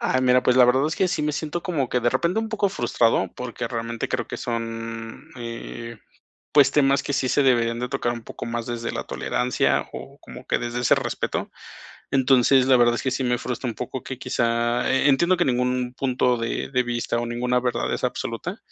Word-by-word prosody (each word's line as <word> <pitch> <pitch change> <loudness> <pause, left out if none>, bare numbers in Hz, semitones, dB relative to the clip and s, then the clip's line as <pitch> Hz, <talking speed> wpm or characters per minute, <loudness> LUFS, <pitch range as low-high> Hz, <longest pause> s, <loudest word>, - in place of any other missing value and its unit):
Ay, 130 - +1
mira, 125 0 +4
pues, 125 - +3
la 125 - +8
verdad 130 +3 +3
es 160 - -3
que 190 - +2
sí 155 - -1
me 150 - 0
siento 155 +3 -3
como 150 -8 -1
que 125 - 0
de 120 0 +2
repente 175 +6 +1
un 225 - -4
poco 210 -2 0
frustrado, 115 - +1
porque 120 -2 -5
realmente 115 -1 -3
creo - - -2
que - - -6
son, 115 -1 -5
eh, 115 -1 -7 0.6
pues, 140 -2 +6
temas 140 -1 +3
que - - -3
sí 130 -1 +1
se 145 - +3
deberían 120 -2 +2
de 125 - -3
tocar 120 0 -1
un 120 -1 -8
poco - - -8
más 115 0 -3
desde 115 -1 -4
la - - -4
tolerancia, 125 0 0
o - - -9
como - - -12
que - - +2
desde 120 0 -3
ese 120 - +4
respeto. - - -3 0.6
Entonces, 130 0 +4
la 130 0 +5
verdad 120 -1 +4
es - - -4
que 130 - 0
sí 130 - -1
me 125 -1 +1
frustra 125 +1 -4
un 115 - -6
poco 125 +2 -5
que 130 - -6
quizá 120 -1 0
eh, 130 - +3
entiendo 170 +6 +4
que 175 - +2
ningún 125 0 0
punto 125 -2 +1
de 115 0 -3
de 125 -2 +1
vista, 120 -1 -2
o 120 - -2
ninguna 125 +1 0
verdad 125 -1 -1
es - - -4
absoluta, 165 - -3
125 Hz, 220 wpm, -24 LUFS, 120-135 Hz, 0.6 s, la